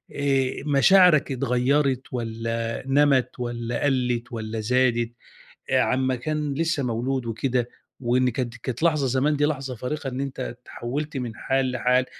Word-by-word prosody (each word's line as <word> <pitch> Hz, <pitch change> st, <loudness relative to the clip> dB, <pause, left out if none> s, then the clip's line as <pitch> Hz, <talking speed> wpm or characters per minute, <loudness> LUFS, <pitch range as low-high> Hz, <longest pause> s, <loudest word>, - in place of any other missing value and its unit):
آآ 135 Hz, -2 st, 0 dB
مشاعرك 150 Hz, +1 st, +5 dB
اتغيّرت 130 Hz, +2 st, +1 dB
والّا 115 Hz, -1 st, -3 dB
نَمَت 135 Hz, -3 st, +3 dB
والّا 120 Hz, -1 st, -3 dB
قَلِّت 125 Hz, -4 st, 0 dB
والّا 110 Hz, -1 st, -4 dB
زادت 120 Hz, 0 st, +1 dB, 0.6 s
آآ -, -, +4 dB
على -, -, +1 dB
أمّا 130 Hz, 0 st, +1 dB
كان 150 Hz, +3 st, -2 dB
لسّه 165 Hz, -1 st, 0 dB
مولود 125 Hz, +2 st, -1 dB
وكده، 120 Hz, +1 st, -1 dB, 0.3 s
وإن 125 Hz, +1 st, +2 dB
كانت 120 Hz, -1 st, -3 dB
كانت 120 Hz, +3 st, -5 dB
لحظة 155 Hz, -5 st, +3 dB
زمان 135 Hz, +4 st, +2 dB
دي 145 Hz, +1 st, +2 dB
لحظة 135 Hz, -4 st, -2 dB
فارقة 135 Hz, +4 st, -4 dB
إن 130 Hz, +1 st, -4 dB
أنت 135 Hz, -1 st, -5 dB
اتحوّلت 130 Hz, +4 st, -5 dB
من 120 Hz, -3 st, -4 dB
حال 135 Hz, +2 st, 0 dB
لحال 125 Hz, 0 st, +2 dB
130 Hz, 150 wpm, -24 LUFS, 120-140 Hz, 0.6 s, مشاعرك